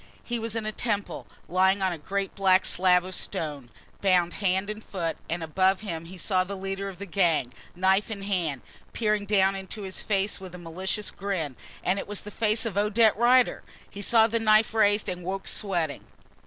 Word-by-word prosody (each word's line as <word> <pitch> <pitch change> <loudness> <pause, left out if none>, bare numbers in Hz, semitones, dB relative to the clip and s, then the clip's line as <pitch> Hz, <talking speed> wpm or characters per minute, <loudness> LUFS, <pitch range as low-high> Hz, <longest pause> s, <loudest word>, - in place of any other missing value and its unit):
He 240 -1 -3
was 225 0 -3
in 225 -1 -2
a 215 - -1
temple, 210 -2 -3 0.2
lying 190 +2 +3
on 185 -2 +1
a - - -6
great 195 +5 -3
black 190 -1 +3
slab 180 0 +4
of 185 - -7
stone, 150 -10 -4 0.3
bound 180 -3 +3
hand 190 0 +1
and 215 +1 -5
foot, 170 -4 -3
and 165 0 -2
above 185 +5 +2
him 165 -6 -5
he 185 +3 -10
saw 185 +1 +1
the 200 +2 -6
leader 195 +1 -4
of 190 - -10
the 200 - -6
gang, 165 -9 +1 0.2
knife 190 +3 +2
in 200 -3 -5
hand, 170 -9 -1 0.3
peering 210 -2 0
down 195 -2 +3
into 195 +2 -7
his 190 -1 -2
face 200 0 0
with 185 -2 -9
a - - -7
malicious 185 +4 -3
grin 180 -9 -3 0.3
and 190 +2 +1
it - - -6
was 205 -1 -2
the 210 - -9
face 220 +2 +1
of 200 -3 -1
Odette 215 +1 +4
Rider! 245 +2 +4 0.3
He 200 - -7
saw 220 +2 +5
the 230 +1 0
knife 215 0 +4
raised 205 -1 +3
and 180 -1 -4
woke 190 +2 -4
sweating. 175 -8 -1
195 Hz, 200 wpm, -26 LUFS, 180-210 Hz, 0.3 s, saw